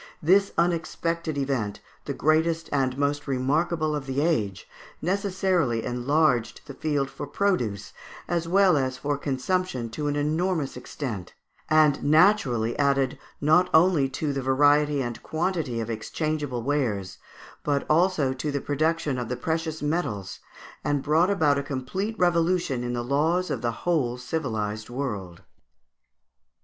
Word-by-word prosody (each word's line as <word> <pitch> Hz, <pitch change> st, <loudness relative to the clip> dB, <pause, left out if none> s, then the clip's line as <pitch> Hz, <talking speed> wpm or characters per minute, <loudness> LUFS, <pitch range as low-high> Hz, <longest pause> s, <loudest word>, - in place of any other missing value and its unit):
This 195 Hz, +5 st, +3 dB
unexpected 165 Hz, -1 st, -1 dB
event, 130 Hz, -7 st, -1 dB, 0.3 s
the -, -, -3 dB
greatest 160 Hz, +1 st, +1 dB
and 135 Hz, -2 st, +1 dB
most 145 Hz, +1 st, -1 dB
remarkable 155 Hz, +4 st, 0 dB
of 140 Hz, -2 st, -5 dB
the 135 Hz, +1 st, -1 dB
age, 110 Hz, -, 0 dB, 0.3 s
necessarily 185 Hz, -, 0 dB
enlarged 125 Hz, 0 st, +1 dB
the 140 Hz, -, -8 dB
field 145 Hz, -1 st, -1 dB
for 135 Hz, 0 st, -7 dB
produce 120 Hz, -, -1 dB, 0.3 s
as 170 Hz, -1 st, -1 dB
well 185 Hz, -2 st, +4 dB
as 130 Hz, -1 st, -1 dB
for 145 Hz, +2 st, -1 dB
consumption 140 Hz, -2 st, -2 dB
to 150 Hz, +5 st, -3 dB
an 145 Hz, -, 0 dB
enormous 155 Hz, +1 st, 0 dB
extent, 110 Hz, -, -6 dB, 0.3 s
and 155 Hz, -2 st, +4 dB
naturally 145 Hz, -, +3 dB
added, 140 Hz, -2 st, +1 dB, 0.2 s
not 160 Hz, +5 st, +4 dB
only 160 Hz, -5 st, +4 dB
to 145 Hz, +1 st, -2 dB
the 135 Hz, -, -2 dB
variety 145 Hz, +2 st, +3 dB
and 120 Hz, -1 st, -5 dB
quantity 160 Hz, -7 st, -2 dB
of 115 Hz, 0 st, -3 dB
exchangeable 145 Hz, +2 st, -3 dB
wares, 115 Hz, -9 st, -1 dB, 0.4 s
but 145 Hz, -1 st, 0 dB
also 160 Hz, -4 st, +2 dB
to 130 Hz, +4 st, -4 dB
the 140 Hz, -, -1 dB
production 150 Hz, -1 st, 0 dB
of 120 Hz, -2 st, -4 dB
the 125 Hz, -, -2 dB
precious 160 Hz, -1 st, -2 dB
metals, 145 Hz, -, -2 dB, 0.4 s
and 145 Hz, -2 st, 0 dB
brought 160 Hz, +5 st, +3 dB
about 155 Hz, -8 st, +3 dB
a -, -, -1 dB
complete 145 Hz, -, -4 dB
revolution 170 Hz, -6 st, +1 dB
in 120 Hz, 0 st, -2 dB
the 120 Hz, -1 st, -2 dB
laws 160 Hz, +8 st, +1 dB
of -, -, -2 dB
the 120 Hz, -, 0 dB
whole 140 Hz, -9 st, +1 dB
civilised 110 Hz, -6 st, -3 dB
world. 105 Hz, -10 st, -5 dB
145 Hz, 140 wpm, -26 LUFS, 130-165 Hz, 0.4 s, well